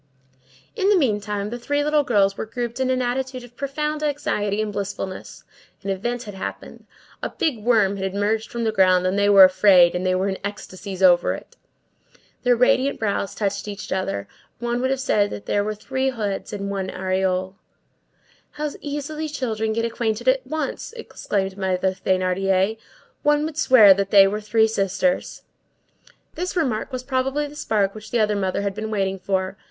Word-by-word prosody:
In 395 -2 +1
the 415 - +5
meantime, 210 - -1
the 240 - -5
three 290 +4 0
little 300 0 +3
girls 200 -6 +2
were 220 - -5
grouped 240 +1 -4
in 260 -1 +1
an 255 -1 +1
attitude 255 +1 -3
of 245 0 -15
profound 300 +3 -3
anxiety 275 -9 -1
and 215 -1 -2
blissfulness; 195 -1 -5 0.4
an 195 - -2
event 240 +6 -3
had 205 - -8
happened; 190 - -7 0.3
a - - -2
big 250 -10 -2
worm 210 -4 +3
had 190 0 -3
emerged 215 +2 0
from 235 -1 -4
the 220 - +1
ground, 185 -3 +4
and 185 +1 +1
they 200 0 +3
were 200 -1 +9
afraid; 185 -2 +6
and 180 - -2
they 185 0 +1
were 190 +2 0
in 190 -1 -3
ecstasies 195 -1 -6
over 175 -1 +5
it. - - -13 0.9
Their 245 -1 +3
radiant 255 +3 +2
brows 200 -2 -2
touched 200 -1 -2
each 205 0 -7
other; 100 - -2 0.3
one 240 +1 -2
would 260 - +1
have 270 0 0
said 205 -5 +2
that 200 - -7
there 205 - +1
were 215 +1 -3
three 260 +5 -2
heads 210 -6 -3
in 200 -1 -4
one 190 -1 -3
aureole. 185 0 -1 1.0
"How 300 0 -3
easily 300 +2 -4
children 220 -6 -2
get 230 +1 0
acquainted 230 0 -2
at 260 0 +2
once!" 310 - -4
exclaimed 195 - -3
Mother 190 0 0
Thénardier; 190 +2 0 0.4
"one 295 0 +2
would 315 -1 -5
swear 220 -7 +8
that 195 0 -2
they 195 -1 +7
were 210 +2 -2
three 220 +1 +3
sisters!" 220 +6 -1 0.9
This 365 +2 -4
remark 265 -9 -1
was 255 -1 -4
probably 270 +2 -1
the 290 0 -10
spark 205 -8 0
which 215 0 -10
the 240 - 0
other 210 -1 +2
mother 195 0 -1
had 200 -1 -1
been 215 +2 -5
waiting 195 -2 -1
for. 190 +1 -2
215 Hz, 180 wpm, -22 LUFS, 195-255 Hz, 1.0 s, were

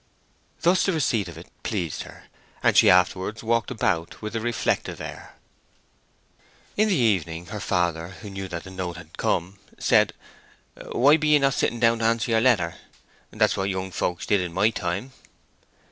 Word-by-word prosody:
Thus 180 +2 +3
the 195 - +2
receipt 115 - 0
of 85 - -10
it - - -10 0.2
pleased 90 -7 -3
her, - - -11 0.4
and - - +4
she - - +7
afterwards 95 +4 +2
walked 115 0 +1
about 85 -5 -1
with 105 +1 -6
a - - 0
reflective 120 0 -1
air. - - -9 1.4
In 215 +1 +3
the 195 - +3
evening 90 - +1
her 105 - -4
father, 85 -4 0
who 100 +3 -10
knew 95 0 -5
that 85 -2 -6
the 95 - -10
note 90 -2 -5
had 80 -2 -12
come, 95 +3 -1 0.2
said, - - +3 0.8
"Why 145 +5 +5
be 155 -1 -1
ye 150 0 +6
not 135 -1 +2
sitting 120 - 0
down 115 -1 +3
to 115 - 0
answer 115 +1 +1
your 110 0 +3
letter? 100 -10 +2 0.5
That's - - +1
what 95 +1 -1
young 95 0 -3
folks 90 -2 -2
did 100 -2 +2
in 90 -2 -4
my 105 +5 +3
time." 100 +6 -3
100 Hz, 175 wpm, -25 LUFS, 90-115 Hz, 1.4 s, she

